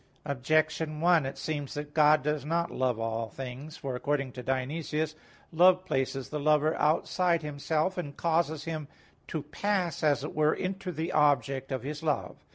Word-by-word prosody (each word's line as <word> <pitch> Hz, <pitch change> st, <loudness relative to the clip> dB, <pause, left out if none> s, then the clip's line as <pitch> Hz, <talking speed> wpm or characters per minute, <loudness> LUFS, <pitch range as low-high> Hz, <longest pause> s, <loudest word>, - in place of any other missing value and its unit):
Objection 155 Hz, +2 st, 0 dB
1: 170 Hz, -4 st, +4 dB
It 135 Hz, -, -6 dB
seems 145 Hz, -3 st, -4 dB
that 145 Hz, 0 st, -5 dB
God 150 Hz, -2 st, +5 dB
does 150 Hz, -2 st, -1 dB
not 170 Hz, +3 st, 0 dB
love 125 Hz, -3 st, 0 dB
all 115 Hz, 0 st, -2 dB
things. 135 Hz, +6 st, -7 dB
For 135 Hz, -4 st, -4 dB
according 140 Hz, 0 st, -1 dB
to 125 Hz, -, -7 dB
Dionysius 150 Hz, +4 st, -1 dB
(Div. 155 Hz, -, -27 dB
Nom. -, -, -26 dB, 0.2 s
iv, 160 Hz, -, -11 dB
1), 180 Hz, -, +9 dB
love 185 Hz, 0 st, +4 dB
places 135 Hz, -4 st, -1 dB
the 150 Hz, -, -3 dB
lover 150 Hz, +1 st, +3 dB
outside 170 Hz, +2 st, +2 dB
himself, 155 Hz, +5 st, -1 dB
and 145 Hz, -5 st, -6 dB
causes 160 Hz, -2 st, +1 dB
him 155 Hz, -3 st, -4 dB, 0.4 s
to 155 Hz, -3 st, -3 dB
pass, 180 Hz, +3 st, -1 dB
as 145 Hz, -2 st, +2 dB
it 150 Hz, -, -5 dB
were, 155 Hz, 0 st, +3 dB
into 190 Hz, 0 st, -3 dB
the 165 Hz, +1 st, -3 dB
object 140 Hz, -2 st, +2 dB
of 130 Hz, -1 st, -2 dB
his 150 Hz, +3 st, -5 dB
love. 150 Hz, -3 st, -1 dB
150 Hz, 185 wpm, -29 LUFS, 140-160 Hz, 0.4 s, 1